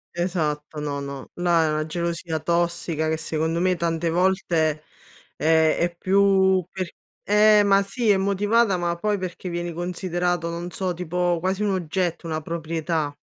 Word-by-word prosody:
Esatto, 155 -4 -2
no, 145 -1 -3
no, 140 -1 -7
là 175 -2 +3
è - - +1
una 155 0 -1
gelosia 170 0 -2
tossica 170 -1 -1
che 160 - 0
secondo 160 +1 -1
me 185 +1 +2
tante 165 -1 -1
volte, 170 -4 +1 0.5
ehm, 160 0 +4
è 170 0 0
più 190 0 +3
per 185 -2 -3 0.4
eh, 210 0 +5
ma 200 -1 +4
sì, 210 +3 0
è 200 - +4
motivata, 200 +2 +2
ma 175 -1 -1
poi 210 +4 -1
perché 185 -1 -5
vieni 175 0 -3
considerato, 175 0 -2
non 170 +1 -5
so, 180 +2 -2
tipo 175 0 -1
quasi 190 +4 -1
un 205 - +1
oggetto, 175 -1 -2
una 160 -1 -2
proprietà. 160 -2 -3
175 Hz, 160 wpm, -24 LUFS, 160-185 Hz, 0.5 s, eh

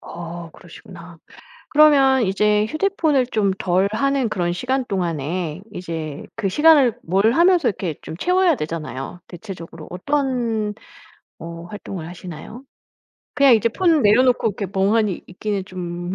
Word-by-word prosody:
어 170 0 -8
그러시구나. 175 0 -13 0.5
그러면 275 -4 +5
이제 210 +2 +2
휴대폰을 310 - +1
좀 205 -5 +1
덜 185 +2 +1
하는 275 +1 +1
그런 175 -4 -1
시간 255 +8 -1
동안에 170 - -3
이제 160 -4 -6
그 205 -4 -1
시간을 280 -2 +4
뭘 195 +6 +2
하면서 340 0 +4
이렇게 180 -5 -3
좀 160 - -8
채워야 360 - +2
되잖아요. 155 - -6
대체적으로 170 -3 -9
어떤 230 -1 -1 0.6
어 170 0 -8
활동을 180 -2 -7
하시나요? 180 - -9 0.7
그냥 280 -3 +6
이제 225 +1 +2
폰 330 +5 +2
내려놓고 240 +2 +4
이렇게 200 0 -4
멍하니 200 0 +1
있기는 195 +1 -4
좀 175 -1 -5
200 Hz, 300 characters per minute, -21 LUFS, 175-260 Hz, 0.7 s, 그냥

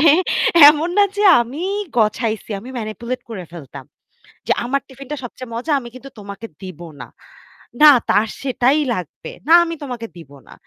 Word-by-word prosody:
মানে 320 - +3 0.6
এমন 305 +3 +2
না 410 - +6
যে 410 - 0 0.2
আমি 250 +7 -5 0.3
গছাইছি। 220 0 -1
আমি 240 - -12
manipulate 235 +3 -6
করে 195 -5 -6
ফেলতাম। 140 -5 -10 0.6
যে - - 0
আমার 275 +3 -1
টিফিনটা 275 +2 -8
সবচেয়ে 245 0 -9
মজা 255 +7 -4
আমি 240 - -10
কিন্তু 265 +2 -11
তোমাকে 200 +2 -9
দিব 185 -4 -9 0.2
না। 125 - -9 0.7
না 300 -1 +10 0.2
তার 210 +2 +3 0.2
সেটাই 265 +2 +1
লাগবে। 180 -7 -7 0.2
না 325 - +5
আমি 335 0 -5
তোমাকে 245 -4 -6
দিব 150 -5 -14 0.2
না। - - -13
240 Hz, 165 wpm, -19 LUFS, 210-275 Hz, 0.7 s, না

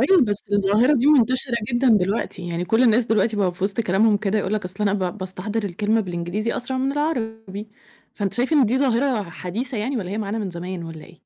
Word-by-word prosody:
أيوه، 320 +4 +5
بس 205 -2 -3
الظاهرة 205 +8 +3
دي 260 +2 +1
مُنتشرة 255 -3 +3 0.2
جدًا 250 +2 +2
دلوقتي، 195 -4 +1
يعني 170 +1 -2
كل 225 +7 +2
الناس 235 0 +4
دلوقتي 220 0 +1
بقى 190 -3 +1
في 185 +2 -4
وسط 200 +3 0
كلامهم 210 +2 +3
كده 205 +1 0
يقول 205 0 -1
لك 210 -3 -2
أصلًا 190 +3 -3
أنا 200 -1 +2
با 185 -2 -1
باستحضر 200 +3 -4
الكلمة 210 +4 0
بالإنجليزي 180 +4 -3
أسرع 260 +2 -2
من 265 +1 0
العربي، 225 -8 -3 0.5
فأنتِ 200 -2 -2
شايفة 250 +7 +1
إن 255 - +4
دي 245 +5 +1
ظاهرة 255 -3 +1
حديثة 225 - -5
يعني 250 +6 -2
والّا 190 -6 -4
هي 210 - -3
معانا 210 +1 -3
من 200 -4 -3
زمان 175 +1 -6
والّا 165 -1 -9
إيه؟ - - -16
215 Hz, 220 wpm, -22 LUFS, 190-240 Hz, 0.5 s, أيوه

